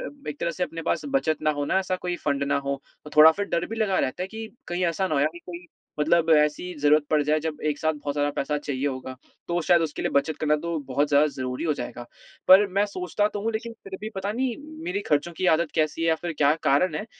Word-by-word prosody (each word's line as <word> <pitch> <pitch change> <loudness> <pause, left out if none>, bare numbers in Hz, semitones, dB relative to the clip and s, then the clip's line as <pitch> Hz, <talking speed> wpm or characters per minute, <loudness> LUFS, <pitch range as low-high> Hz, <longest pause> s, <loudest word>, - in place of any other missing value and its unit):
फिर 290 - -9
एक 145 - -9
तरह 170 - 0
से 180 +2 -5
अपने 165 -2 -3
पास - - -1
बचत 160 - 0
ना 155 - +3
हो 145 - 0
ना, 190 - +1
ऐसा 185 -1 -1
कोई 180 -1 -3
फंड 140 -1 0
ना 140 - +1
हो, 140 0 -3 0.2
तो 150 - -10
थोड़ा 155 +1 +10
फिर 200 +3 -3
डर 170 +1 -1
भी 225 - -6
लगा 210 -4 +1
रहता 130 +8 -1
है - - -2
कि 220 +1 -7 0.2
कहीं 175 +1 -1
ऐसा 170 +3 0
ना - - -1
हो 140 - +2
यार, 150 - +3
कि 175 - -10
कोई 175 0 -8 0.3
मतलब 165 +2 +3
ऐसी 150 +4 +3
ज़रूरत 150 +1 +4
पड़ 150 -1 +3
जाए, 150 +1 +1
जब 155 -1 -4
एक 145 - -4
साथ 160 0 +1
बहुत 145 -1 -5
ज़्यादा 145 0 +1
पैसा 150 +2 -1
चाहिए 140 -1 -3
होगा। 130 -1 -4 0.3
तो 175 0 0
शायद 175 +1 +4
उसके 155 -2 -3
लिए - - 0
बचत 140 +2 +1
करना 150 -1 +2
तो 170 +1 -3
बहुत 145 +3 0
ज़्यादा 145 +1 +5
ज़रूरी 130 -1 -4
हो 155 - +2
जाएगा। 120 -1 -6 0.5
पर 195 +2 +8
मैं 200 +1 +3
सोचता 200 +1 -1
तो 205 - -2
हूँ, 225 +1 -1
लेकिन 230 +1 -4
फिर 195 -1 -7
भी 215 +1 -5
पता 195 +1 -2
नहीं, 245 0 -1 0.3
मेरी 190 +3 -2
खर्चों 150 +3 +1
की 185 - -1
आदत 170 -2 -2
कैसी 155 0 0
है 165 - +2
या 160 - +4
फिर 175 - -2
क्या 145 +1 +4
कारण 150 +4 +2
है, 210 - -4
160 Hz, 270 wpm, -25 LUFS, 145-185 Hz, 0.5 s, थोड़ा